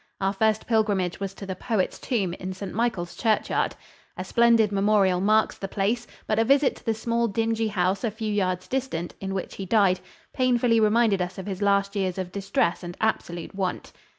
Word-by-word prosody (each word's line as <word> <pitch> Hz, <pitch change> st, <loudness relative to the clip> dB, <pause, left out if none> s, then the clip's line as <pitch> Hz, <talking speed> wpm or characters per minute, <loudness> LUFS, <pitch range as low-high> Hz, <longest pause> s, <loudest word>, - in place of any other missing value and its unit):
Our 195 Hz, 0 st, 0 dB
first 220 Hz, +1 st, +1 dB
pilgrimage 205 Hz, -6 st, +1 dB
was 195 Hz, 0 st, -4 dB
to 195 Hz, -, -8 dB
the 190 Hz, -1 st, -4 dB
poet's 215 Hz, -1 st, -1 dB
tomb, 200 Hz, -9 st, -1 dB
in 185 Hz, +1 st, -5 dB
St. 190 Hz, +1 st, -7 dB
Michael's 195 Hz, -6 st, -1 dB
churchyard. 220 Hz, -3 st, 0 dB, 0.4 s
A -, -, -3 dB
splendid 235 Hz, -3 st, +4 dB
memorial 195 Hz, -2 st, +3 dB
marks 215 Hz, +2 st, +2 dB
the 195 Hz, -, -4 dB
place, 215 Hz, +5 st, -1 dB, 0.2 s
but 215 Hz, 0 st, 0 dB
a -, -, +5 dB
visit 275 Hz, +3 st, +3 dB
to -, -, -18 dB
the 225 Hz, -, +2 dB
small 235 Hz, +1 st, 0 dB
dingy 225 Hz, +1 st, 0 dB
house 190 Hz, 0 st, 0 dB
a 230 Hz, -, +1 dB
few 215 Hz, 0 st, -4 dB
yards 185 Hz, -3 st, -1 dB
distant, 255 Hz, -11 st, -3 dB
in 195 Hz, 0 st, -3 dB
which 190 Hz, -, -5 dB
he 195 Hz, -, -4 dB
died, 195 Hz, -3 st, +3 dB, 0.3 s
painfully 245 Hz, -3 st, +3 dB
reminded 215 Hz, -2 st, +3 dB
us 180 Hz, +1 st, -3 dB
of 190 Hz, -, -6 dB
his 195 Hz, -1 st, -5 dB
last 200 Hz, 0 st, +2 dB
years 190 Hz, -2 st, -1 dB
of 185 Hz, -1 st, -4 dB
distress 195 Hz, -3 st, 0 dB
and 175 Hz, -1 st, -7 dB
absolute 175 Hz, -6 st, -2 dB
want. 190 Hz, -2 st, -3 dB
200 Hz, 195 wpm, -25 LUFS, 190-225 Hz, 0.4 s, a